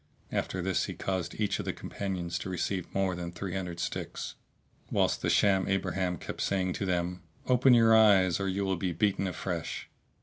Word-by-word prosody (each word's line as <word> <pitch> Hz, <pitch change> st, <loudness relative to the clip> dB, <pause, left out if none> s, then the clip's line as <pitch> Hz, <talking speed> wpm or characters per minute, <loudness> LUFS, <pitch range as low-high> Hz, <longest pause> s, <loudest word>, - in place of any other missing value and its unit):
After 95 Hz, -2 st, -2 dB
this 95 Hz, 0 st, +1 dB
he -, -, -6 dB
caused 95 Hz, -1 st, -3 dB
each 105 Hz, -2 st, 0 dB
of -, -, -3 dB
the -, -, -1 dB
companions 90 Hz, -3 st, -4 dB
to 95 Hz, -, -5 dB
receive 95 Hz, 0 st, -2 dB
more 95 Hz, -1 st, +1 dB
than 85 Hz, -1 st, -5 dB
three 90 Hz, +1 st, -5 dB
hundred 90 Hz, -3 st, -4 dB
sticks, -, -, -4 dB, 0.6 s
whilst -, -, +1 dB
the -, -, 0 dB
sham 95 Hz, -2 st, +3 dB
abraham 95 Hz, -2 st, 0 dB
kept -, -, -6 dB
saying 95 Hz, -2 st, 0 dB
to 100 Hz, -, -3 dB
them 90 Hz, 0 st, -1 dB, 0.2 s
"Open 125 Hz, 0 st, +5 dB
your 115 Hz, -1 st, +6 dB
eyes 100 Hz, -5 st, +5 dB
or 100 Hz, -, -1 dB
you 100 Hz, +1 st, -1 dB
will 95 Hz, -1 st, 0 dB
be 90 Hz, 0 st, -1 dB
beaten 95 Hz, +2 st, +1 dB
afresh." 90 Hz, -3 st, -4 dB
95 Hz, 190 wpm, -30 LUFS, 90-100 Hz, 0.6 s, your